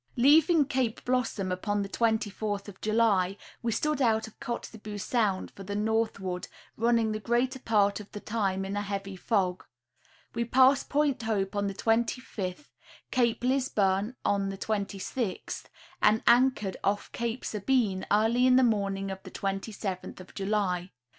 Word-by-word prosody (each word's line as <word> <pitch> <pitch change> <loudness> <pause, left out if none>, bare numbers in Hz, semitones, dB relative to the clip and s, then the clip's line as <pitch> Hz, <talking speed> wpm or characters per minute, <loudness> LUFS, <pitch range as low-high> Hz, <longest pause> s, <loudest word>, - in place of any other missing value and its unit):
Leaving 295 +4 +5
Cape 255 -5 -1
Blossom 240 -7 0
upon 205 +3 -1
the - - -4
24th 215 -2 -1
of 200 -2 -11
July 210 -4 +2 0.2
we 235 - -1
stood 300 +5 0
out 220 -3 +3
of 220 - -16
Kotzebue 215 -3 -6
sound 205 -3 0
for - - -12
the 200 +1 -5
northward, 210 -4 -1 0.3
running 230 -1 +2
the 215 - -2
greater 240 +4 0
part 205 -4 +2
of 210 - -11
the 210 - -6
time 195 -3 -1
in 195 +1 -4
a 205 - 0
heavy 195 -1 -4
fog. 185 -2 0 0.7
We 235 - 0
passed 260 +3 +4
Point 290 -3 +1
Hope 210 -3 -1
on 205 0 0
the 195 - -4
25th, 225 0 -1 0.4
Cape 240 -2 +1
Lisburne 230 -5 +1
on 200 -1 +1
the 195 - -5
26th, 200 +1 -3 0.4
and 215 +1 +4
anchored 240 -5 +3
off 205 +1 0
Cape 235 +1 -3
Sabine 210 -3 0
early 225 +4 +4
in 255 - +6
the 260 - +6
morning 195 -4 0
of 190 0 -6
the - - -10
27th 195 -1 -4
of 185 - -12
July. 195 -3 -1
215 Hz, 155 wpm, -29 LUFS, 195-235 Hz, 0.7 s, in